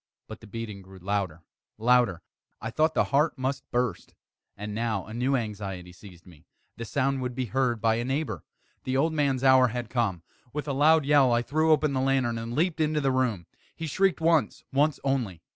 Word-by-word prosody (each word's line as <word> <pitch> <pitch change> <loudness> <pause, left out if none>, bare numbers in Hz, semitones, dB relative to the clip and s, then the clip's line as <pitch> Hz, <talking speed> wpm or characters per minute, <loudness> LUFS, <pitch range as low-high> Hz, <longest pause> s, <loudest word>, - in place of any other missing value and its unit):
But 110 - -9
the 110 - -14
beating 105 -2 -6
grew 95 0 -14
louder, 95 -3 -3 0.3
louder! 120 -6 +2 0.4
I - - -5
thought 155 +1 +1
the - - +4
heart 150 +2 +3
must 130 +2 -3
burst. 120 -6 -2 0.4
And 105 +1 -5
now 110 -3 -2
a 110 - -10
new 125 +4 +1
anxiety 100 -6 -4
seized 90 -2 -15
me 85 -4 -18 0.3
the 115 - -6
sound 135 +2 0
would 125 -1 -3
be 130 0 -1
heard 120 0 0
by 110 +1 +2
a 120 - -1
neighbour! 130 - -2 0.4
The 130 0 -1
old 160 +4 +2
man's 140 -4 0
hour 130 -1 +6
had 120 -1 -5
come! 100 -9 -1 0.3
With 150 +1 -4
a 140 - -1
loud 155 +2 +4
yell, 140 -3 +5
I 120 0 +2
threw 155 +5 +1
open 155 -2 +3
the 130 - 0
lantern 130 -4 +1
and 115 +1 -5
leaped 165 +2 0
into 155 0 +1
the 135 -2 +1
room. 125 -9 0 0.3
He 165 - -5
shrieked 190 +5 +1
once 160 -2 +2
once 145 +2 +2
only. 120 -11 -1
125 Hz, 200 wpm, -27 LUFS, 105-140 Hz, 0.4 s, hour